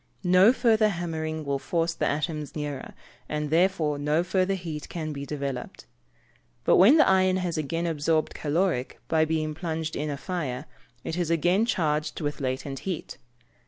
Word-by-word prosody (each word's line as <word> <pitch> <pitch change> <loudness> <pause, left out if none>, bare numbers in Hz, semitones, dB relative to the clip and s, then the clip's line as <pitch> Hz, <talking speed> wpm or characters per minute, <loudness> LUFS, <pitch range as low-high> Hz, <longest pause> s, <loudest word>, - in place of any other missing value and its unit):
No 185 +4 +6
further 225 -4 +3
hammering 160 -4 -3
will 140 -1 -1
force 165 +3 -1
the - - -1
atoms 150 0 -2
nearer, 145 -3 -5 0.3
and 150 -1 -2
therefore 165 -4 +2
no 150 +3 +1
further 185 +2 +1
heat 165 -5 -6
can 155 -3 -4
be 140 0 -6
developed. 140 -4 -5 0.8
But - - +4
when 225 - +7
the 305 - +6
iron 185 -1 +4
has 180 -2 -2
again 165 +2 -2
absorbed 160 -1 0
caloric, 155 -3 -1
by 160 -1 +3
being 155 -1 -1
plunged 160 0 -3
in 150 +1 -2
a 140 - -3
fire, 145 -5 -4 0.4
it 160 - -4
is 175 -3 -1
again 175 +7 +2
charged 155 -7 0
with 145 -2 -3
latent 135 +1 -3
heat. 185 -4 -5
160 Hz, 160 wpm, -26 LUFS, 150-180 Hz, 0.8 s, when